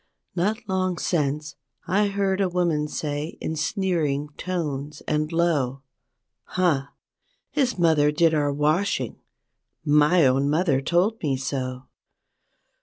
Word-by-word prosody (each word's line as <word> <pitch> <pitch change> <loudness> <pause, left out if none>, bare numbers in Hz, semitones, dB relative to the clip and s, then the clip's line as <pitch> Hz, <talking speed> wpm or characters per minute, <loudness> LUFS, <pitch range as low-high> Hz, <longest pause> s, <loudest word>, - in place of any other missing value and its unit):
Not 215 +6 -1
long 185 -2 0
since, 150 -2 -1 0.3
I 200 +4 +2
heard 200 -1 0
a 190 - +2
woman 170 -4 0
say 150 +1 -4
in 160 - -3
sneering 160 -4 -1
tones 150 -5 -4
and 155 +1 0
low, 145 -6 0 0.6
"Huh! 165 -7 +1 0.6
his 265 -6 0
mother 160 -4 +4
did 165 +1 +3
our 145 -2 +1
washing, 150 - 0 0.6
my 150 +2 +5
own 135 +2 +3
moth¬ 160 +6 +1
er 135 -1 +3
told 180 +9 +1
me 140 -4 0
so!" 130 -1 -3
155 Hz, 120 wpm, -24 LUFS, 145-180 Hz, 0.6 s, my